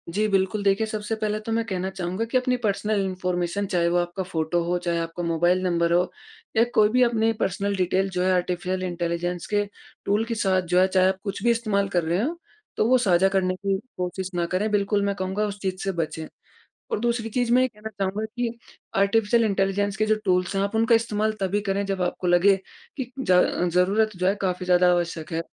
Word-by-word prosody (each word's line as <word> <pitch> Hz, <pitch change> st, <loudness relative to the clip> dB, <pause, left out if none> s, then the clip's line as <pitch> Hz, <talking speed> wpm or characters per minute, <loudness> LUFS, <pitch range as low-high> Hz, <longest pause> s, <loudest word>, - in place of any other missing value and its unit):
जी 215 Hz, +1 st, +2 dB
बिल्कुल 195 Hz, +2 st, +1 dB
देखिए 200 Hz, +2 st, +2 dB
सबसे 215 Hz, 0 st, -3 dB
पहले 215 Hz, 0 st, 0 dB
तो 225 Hz, -, -3 dB
मैं 230 Hz, +1 st, +1 dB
कहना 190 Hz, -1 st, -2 dB
चाहूँगा 190 Hz, +3 st, -3 dB
कि 245 Hz, +3 st, +1 dB
अपनी 250 Hz, 0 st, +1 dB
पर्सनल 210 Hz, 0 st, 0 dB
इन्फॉर्मेशन 180 Hz, +1 st, -2 dB
चाहे 170 Hz, -1 st, +2 dB
वो 175 Hz, -, +1 dB
आपका 175 Hz, +2 st, -2 dB
फ़ोटो 170 Hz, -1 st, -1 dB
हो, 175 Hz, +1 st, 0 dB
चाहे 170 Hz, -1 st, -2 dB
आपका 165 Hz, +1 st, -4 dB
मोबाइल 175 Hz, +2 st, +2 dB
नंबर 170 Hz, -2 st, +1 dB
हो 180 Hz, +1 st, +2 dB, 0.5 s
या 225 Hz, -, +6 dB
कोई 210 Hz, -1 st, +5 dB
भी 250 Hz, +3 st, +2 dB
अपनी 225 Hz, -1 st, +2 dB
पर्सनल 200 Hz, +1 st, 0 dB
डिटेल 190 Hz, +1 st, +1 dB
जो 180 Hz, -1 st, -1 dB
है। 185 Hz, -, +2 dB
आर्टिफिशियल 180 Hz, +1 st, -1 dB
इंटेलिजेंस 175 Hz, -2 st, -3 dB
के 205 Hz, 0 st, +2 dB, 0.4 s
टूल 205 Hz, +3 st, +1 dB
के 230 Hz, 0 st, -3 dB
साथ 190 Hz, -3 st, +2 dB
जो 180 Hz, +1 st, +1 dB
है 185 Hz, -, +5 dB
चाहे 185 Hz, -1 st, +3 dB
आप 190 Hz, 0 st, 0 dB
कुछ 200 Hz, +2 st, -5 dB
भी 240 Hz, -, +4 dB
इस्तेमाल 215 Hz, -4 st, 0 dB
कर 170 Hz, -, +2 dB
रहे 170 Hz, +4 st, 0 dB
हों, 310 Hz, +9 st, -1 dB, 0.4 s
तो -, -, +2 dB
वो 255 Hz, -, +6 dB
साझा 190 Hz, -5 st, +3 dB
करने 185 Hz, -1 st, +1 dB
की 195 Hz, 0 st, -1 dB, 0.2 s
कोशिश 180 Hz, +1 st, -3 dB
ना 175 Hz, -, +1 dB
करें। 185 Hz, +5 st, -1 dB
बिल्कुल 205 Hz, 0 st, +1 dB
मैं 200 Hz, -, 0 dB
कहूँगा 190 Hz, +2 st, -1 dB
उस 205 Hz, 0 st, -6 dB
चीज़ 190 Hz, -1 st, -3 dB
से 195 Hz, -, 0 dB
बचें 160 Hz, 0 st, -3 dB, 0.7 s
और -, -, 0 dB
दूसरी 235 Hz, -1 st, -1 dB
चीज़ 245 Hz, +1 st, 0 dB
मैं 255 Hz, -, +5 dB
ये 255 Hz, -, +3 dB
कहना 215 Hz, -1 st, -9 dB
चाहूँगा 195 Hz, +3 st, -1 dB
कि 235 Hz, -1 st, -2 dB, 0.4 s
आर्टिफिशियल 225 Hz, +3 st, +3 dB
इंटेलिजेंस 200 Hz, 0 st, 0 dB
के 215 Hz, -, +2 dB
जो 215 Hz, -, +3 dB
टूल्स 180 Hz, 0 st, +1 dB
आप 200 Hz, +2 st, -1 dB
उनका 225 Hz, +1 st, +4 dB
इस्तेमाल 215 Hz, -1 st, 0 dB
तभी 195 Hz, +2 st, 0 dB
करें, 200 Hz, 0 st, -1 dB
जब 195 Hz, -1 st, -2 dB
आपको 180 Hz, 0 st, -2 dB
लगे 175 Hz, +3 st, +5 dB, 0.4 s
कि 255 Hz, -2 st, -4 dB
ज 185 Hz, -9 st, +2 dB, 0.4 s
ज़रूरत 205 Hz, +4 st, +2 dB
जो 180 Hz, +1 st, 0 dB
है 195 Hz, -, +3 dB
काफ़ी 180 Hz, -1 st, -1 dB
ज़्यादा 180 Hz, 0 st, +4 dB
आवश्यक 170 Hz, -2 st, -2 dB
है। 165 Hz, -, 0 dB
195 Hz, 215 wpm, -24 LUFS, 180-215 Hz, 0.7 s, या